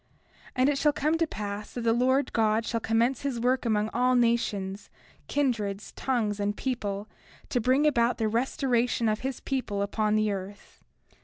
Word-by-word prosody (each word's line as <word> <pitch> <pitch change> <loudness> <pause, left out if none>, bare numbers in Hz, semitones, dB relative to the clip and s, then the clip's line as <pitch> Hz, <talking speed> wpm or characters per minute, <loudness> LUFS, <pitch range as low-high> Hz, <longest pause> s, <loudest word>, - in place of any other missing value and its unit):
30:8 - - -41 0.5
And 255 +2 +3
it 290 - +1
shall 295 -1 +3
come 305 +3 +1
to 330 - +2
pass 205 -4 -5
that 245 - -3
the 230 -1 +2
Lord 260 +4 +2
God 220 0 +2
shall 230 - -1
commence 230 +4 +1
his 275 -4 -2
work 250 +2 +1
among 215 -1 +1
all 250 +1 +3
nations, 205 -5 0 0.4
kindreds, 215 -8 -1
tongues, 220 -6 -1
and 205 0 -1
people, 210 -6 -3 0.4
to 245 - 0
bring 260 +6 +3
about 240 -5 +2
the 220 - 0
restoration 240 0 +1
of 215 0 +1
his 265 0 -4
people 230 -7 -2
upon 210 +1 0
the 215 -1 +2
earth. 200 +1 -8
230 Hz, 175 wpm, -27 LUFS, 210-255 Hz, 0.5 s, And